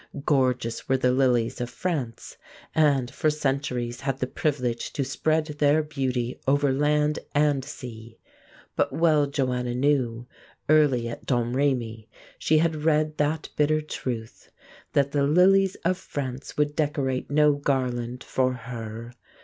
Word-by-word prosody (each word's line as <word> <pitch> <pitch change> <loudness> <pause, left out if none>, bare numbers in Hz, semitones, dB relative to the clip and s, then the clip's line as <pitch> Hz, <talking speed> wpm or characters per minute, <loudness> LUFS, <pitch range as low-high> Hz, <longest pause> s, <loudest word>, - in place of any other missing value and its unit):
Gorgeous 125 -5 0
were 135 - +3
the 125 -1 +2
lilies 125 -3 +1
of 120 - -3
France, 125 -4 -4 0.4
and 140 -5 +2
for 155 - +1
centuries 135 -5 -2
had 135 -1 -2
the 130 - -1
privilege 130 -6 -2
to 145 - -1
spread 155 +3 0
their 150 0 +2
beauty 130 -5 -2
over 145 0 +3
land 150 +1 +1 0.2
and 145 -2 +2
sea;... 115 -5 -9 0.6
but - - +1
well 155 -3 +3
Joanna 125 -3 -1
knew, 125 -3 +1 0.4
early 145 -6 +4
at 115 - -8
Domrémy 120 -3 0 0.3
she 155 - +3
had 155 -1 +1
read 155 -1 +2
that 150 +2 0
bitter 155 +1 +2
truth, 120 -7 -6 0.4
that 140 0 +2
the 145 - +1
lilies 185 +6 +4
of 185 +1 +1
France 135 -1 -6
would 150 0 +1
decorate 140 -4 -1
no 150 +1 +4
garland 125 -4 -2
for 130 -1 0
her. 115 -1 -7
135 Hz, 135 wpm, -25 LUFS, 125-150 Hz, 0.6 s, early